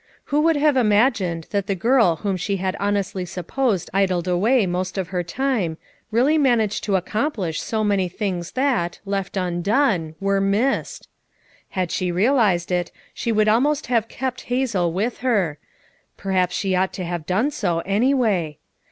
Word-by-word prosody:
Who 295 Hz, -, +4 dB
would 325 Hz, +1 st, +3 dB
have 295 Hz, 0 st, +3 dB
imagined 210 Hz, -7 st, +2 dB
that 200 Hz, -2 st, -1 dB
the 195 Hz, -, 0 dB
girl 225 Hz, -3 st, +3 dB
whom 195 Hz, +3 st, -2 dB
she 195 Hz, +2 st, -2 dB
had 185 Hz, 0 st, -2 dB
honestly 200 Hz, -2 st, -1 dB
supposed 185 Hz, +4 st, -2 dB
idled 185 Hz, -3 st, +1 dB
away 205 Hz, +6 st, +3 dB
most 180 Hz, +1 st, -3 dB
of 185 Hz, -3 st, -2 dB
her 180 Hz, -2 st, -1 dB
time, 190 Hz, -3 st, -1 dB, 0.3 s
really 260 Hz, +8 st, +3 dB
managed 235 Hz, -7 st, +2 dB
to 200 Hz, -2 st, +1 dB
accomplish 190 Hz, -, -1 dB
so 220 Hz, -1 st, -2 dB
many 200 Hz, -3 st, +1 dB
things 180 Hz, -3 st, -4 dB
that, 255 Hz, -11 st, 0 dB
left 195 Hz, -1 st, -3 dB
undone, 180 Hz, -, 0 dB
were 195 Hz, 0 st, +1 dB
missed 210 Hz, +8 st, 0 dB, 0.7 s
I 185 Hz, -, 0 dB
Had 180 Hz, -, -2 dB
she 180 Hz, -1 st, -1 dB
realized 195 Hz, -3 st, +2 dB
it, 175 Hz, -1 st, -1 dB, 0.2 s
she 235 Hz, -, -2 dB
would 215 Hz, -1 st, +2 dB
almost 280 Hz, +7 st, +2 dB
have 225 Hz, -2 st, +2 dB
kept 255 Hz, 0 st, -4 dB
Hazel 230 Hz, -9 st, 0 dB
with 210 Hz, +8 st, -2 dB
her; 200 Hz, -, 0 dB, 0.6 s
perhaps 185 Hz, -2 st, 0 dB
she 190 Hz, -2 st, 0 dB
ought 190 Hz, +1 st, +1 dB
to 185 Hz, -, -4 dB
have 170 Hz, -2 st, -4 dB
done 215 Hz, +11 st, +1 dB
so, 175 Hz, -, -1 dB
anyway. 205 Hz, -, +1 dB
200 Hz, 160 wpm, -22 LUFS, 180-240 Hz, 0.7 s, Who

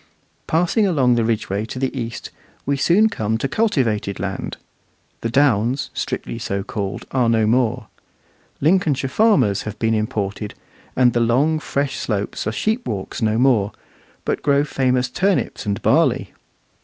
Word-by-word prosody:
Passing 175 Hz, +6 st, +2 dB
along 135 Hz, -9 st, +3 dB
the 120 Hz, -1 st, +2 dB
Ridgeway 105 Hz, -3 st, -1 dB
to 115 Hz, -, -7 dB
the 135 Hz, +1 st, -2 dB
east, 115 Hz, -3 st, -5 dB, 0.3 s
we 140 Hz, -, +1 dB
soon 175 Hz, +10 st, +4 dB
come 110 Hz, -, -1 dB
to 125 Hz, -, -1 dB
cultivated 120 Hz, -, 0 dB
land. 95 Hz, 0 st, -4 dB, 0.6 s
The 115 Hz, -, -2 dB
downs, 130 Hz, -1 st, +2 dB
strictly 115 Hz, -, -4 dB
so 100 Hz, -4 st, -2 dB
called, 100 Hz, -2 st, -4 dB
are 125 Hz, -3 st, +2 dB
no 110 Hz, -1 st, +3 dB
more. 120 Hz, +1 st, +1 dB, 0.8 s
Lincolnshire 150 Hz, -4 st, +2 dB
farmers 135 Hz, -, +3 dB
have 110 Hz, -1 st, -6 dB
been 115 Hz, 0 st, +1 dB
imported, 105 Hz, -1 st, -2 dB, 0.4 s
and 125 Hz, -2 st, +4 dB
the 120 Hz, -, +1 dB
long, 135 Hz, +7 st, +2 dB
fresh 140 Hz, -2 st, -2 dB
slopes 100 Hz, -3 st, -3 dB
are -, -, 0 dB
sheep 220 Hz, -, -1 dB
walks 100 Hz, 0 st, -4 dB
no 110 Hz, 0 st, +2 dB
more, 115 Hz, -6 st, +3 dB, 0.5 s
but -, -, -1 dB
grow 140 Hz, 0 st, +3 dB
famous 130 Hz, -3 st, +1 dB
turnips 185 Hz, -, -1 dB
and 100 Hz, -1 st, -1 dB
barley. -, -, +2 dB
120 Hz, 150 wpm, -21 LUFS, 110-140 Hz, 0.8 s, soon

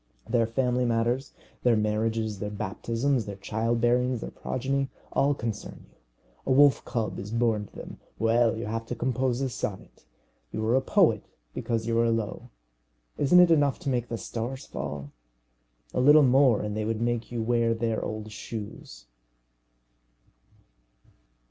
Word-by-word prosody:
Their 115 Hz, -2 st, +2 dB
family 125 Hz, +1 st, 0 dB
matters 120 Hz, +3 st, 0 dB, 0.3 s
their 120 Hz, -2 st, +4 dB
marriages, 110 Hz, 0 st, -1 dB
their 105 Hz, -, -3 dB
baptisms, 115 Hz, +5 st, -1 dB
their 100 Hz, -, -6 dB
child 115 Hz, +4 st, -1 dB
bearings, 125 Hz, 0 st, +2 dB
their -, -, -6 dB
progeny 135 Hz, +1 st, -2 dB, 0.2 s
all 140 Hz, +1 st, +2 dB
concern 115 Hz, -5 st, -6 dB
you. -, -, -29 dB, 0.5 s
A -, -, +1 dB
wolf 140 Hz, +1 st, +5 dB
cub 115 Hz, -5 st, -2 dB
is 100 Hz, -, -6 dB
born 115 Hz, -2 st, 0 dB
to -, -, -24 dB
them. -, -, -9 dB, 0.2 s
Well, 115 Hz, 0 st, +2 dB
you 115 Hz, -, -4 dB
have 115 Hz, +1 st, -4 dB
to 125 Hz, -, -3 dB
compose 125 Hz, +1 st, 0 dB
a 135 Hz, -, 0 dB
sonnet. 105 Hz, -6 st, -6 dB, 0.5 s
You 110 Hz, 0 st, -3 dB
are 115 Hz, +3 st, +3 dB
a 135 Hz, -, +3 dB
poet -, -, +3 dB, 0.3 s
because 115 Hz, -1 st, -2 dB
you 115 Hz, 0 st, +1 dB
are 115 Hz, 0 st, +3 dB
low. 115 Hz, -2 st, -2 dB, 0.7 s
Isn't 180 Hz, +6 st, +6 dB
it 175 Hz, -1 st, +5 dB
enough 145 Hz, -4 st, +3 dB
to 140 Hz, -, -2 dB
make 120 Hz, -2 st, 0 dB
the 115 Hz, -, -4 dB
stars 120 Hz, +6 st, -5 dB
fall! 70 Hz, 0 st, -6 dB, 0.8 s
A -, -, 0 dB
little 150 Hz, +3 st, +7 dB
more, 130 Hz, -3 st, +4 dB
and 105 Hz, 0 st, -3 dB
they 110 Hz, -, -1 dB
would 110 Hz, 0 st, -2 dB
make 120 Hz, 0 st, -1 dB
you 120 Hz, -2 st, -2 dB
wear 115 Hz, 0 st, +2 dB
their 115 Hz, -1 st, -1 dB
old 110 Hz, 0 st, -5 dB
shoes. 105 Hz, -, -8 dB
115 Hz, 160 wpm, -27 LUFS, 110-125 Hz, 0.8 s, little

